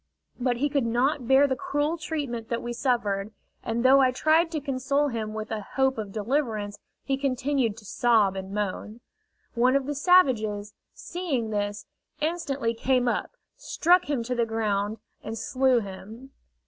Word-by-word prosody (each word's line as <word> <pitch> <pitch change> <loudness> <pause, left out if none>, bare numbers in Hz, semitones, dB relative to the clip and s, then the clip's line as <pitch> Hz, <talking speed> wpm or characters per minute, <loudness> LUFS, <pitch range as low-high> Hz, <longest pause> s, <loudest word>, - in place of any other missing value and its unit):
But 245 -1 0
he 285 +4 +1
could 280 -4 0
not 250 +2 0
bear 270 +2 +6
the 265 -2 0
cruel 305 -1 -1
treatment 285 -8 -4
that 235 - -2
we 240 - -4
suffered; 220 -5 -1 0.3
and 235 +2 -2
though 270 +1 +7
I 260 - +5
tried 315 +6 +3
to 325 -2 -2
console 280 +1 0
him 220 -3 -4
with 215 +1 -5
a 220 -1 -2
hope 265 -2 +2
of 205 -2 -5
deliverance, 215 -2 -2 0.2
he 270 -1 -1
continued 265 -4 0
to 210 - -13
sob 215 -3 +2
and 190 0 -6
moan. 210 +2 -4 0.5
One 250 +2 +3
of 275 -1 +1
the 290 - -2
savages, 230 - +3 0.2
seeing 285 -11 -3
this, 205 0 -2 0.3
instantly 295 -7 -1
came 250 +1 +1
up, 370 - -2 0.2
struck 355 -7 +2
him 270 -5 0
to 250 - -3
the 235 -2 0
ground, 215 -1 -1 0.3
and 225 +1 -5
slew 255 +1 +2
him. 215 +6 -10
245 Hz, 165 wpm, -26 LUFS, 220-280 Hz, 0.5 s, though